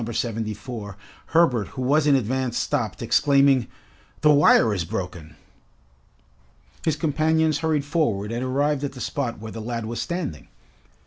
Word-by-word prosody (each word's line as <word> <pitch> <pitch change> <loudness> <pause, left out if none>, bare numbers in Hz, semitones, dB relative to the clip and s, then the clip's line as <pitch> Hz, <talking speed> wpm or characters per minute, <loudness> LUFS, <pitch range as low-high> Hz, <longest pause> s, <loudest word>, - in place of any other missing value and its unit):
74, 110 -2 -4 0.3
Herbert, 145 -10 +2
who - - -2
was 145 +4 +2
in 145 - +5
advance 130 0 -1
stopped, 120 -7 -2
exclaiming, 140 -1 +3 0.5
"The 150 - +5
wire 140 -6 +5
is 95 -4 -1
broken!" 85 -3 -6 1.5
His 160 - +1
companions 155 0 +1
hurried 155 -3 0
forward 115 - -1
and 120 +2 -2
arrived 140 +2 0
at 140 - -3
the 130 - -10
spot 130 -3 -3
where 110 +1 -8
the 115 - -7
lad 115 0 -4
was 115 +1 -4
standing. 170 - -4
130 Hz, 140 wpm, -24 LUFS, 110-150 Hz, 1.5 s, in